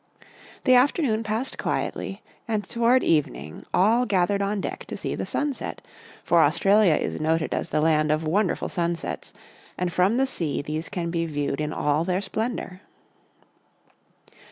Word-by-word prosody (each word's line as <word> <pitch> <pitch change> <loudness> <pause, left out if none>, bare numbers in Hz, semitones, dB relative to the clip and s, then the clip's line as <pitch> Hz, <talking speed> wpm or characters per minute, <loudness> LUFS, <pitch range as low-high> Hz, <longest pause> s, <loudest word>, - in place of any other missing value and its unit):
The 255 - +5
afternoon 255 -3 +3
passed 225 +4 -3
quietly - - -3 0.2
and 215 -2 -1
toward 235 +5 +2
eve 150 -2 +3
ning 75 - -10
all 225 +7 +3
gathered 200 0 +2
on 200 +1 -1
deck - - -5
to - - -6
see - - -3
the - - -4
sunset, 290 -2 -2 0.4
for - - +4
Australia 200 -4 +4
is - - -2
noted 160 +1 0
as - - -2
the 150 - +1
land 155 -1 +3
of 155 +1 +1
wonderful 185 +4 0
sun 170 -1 -1
sets, 165 - -6 0.5
and 180 -1 -2
from 185 +7 +3
the 265 - +3
sea 165 - -1
these 155 +3 -4
can 170 -2 -3
be 165 -1 -1
viewed 145 -1 -2
in 150 0 -2
all 150 +1 +1
their 180 +1 0
splendour. 200 -2 -4
180 Hz, 160 wpm, -25 LUFS, 155-220 Hz, 0.5 s, The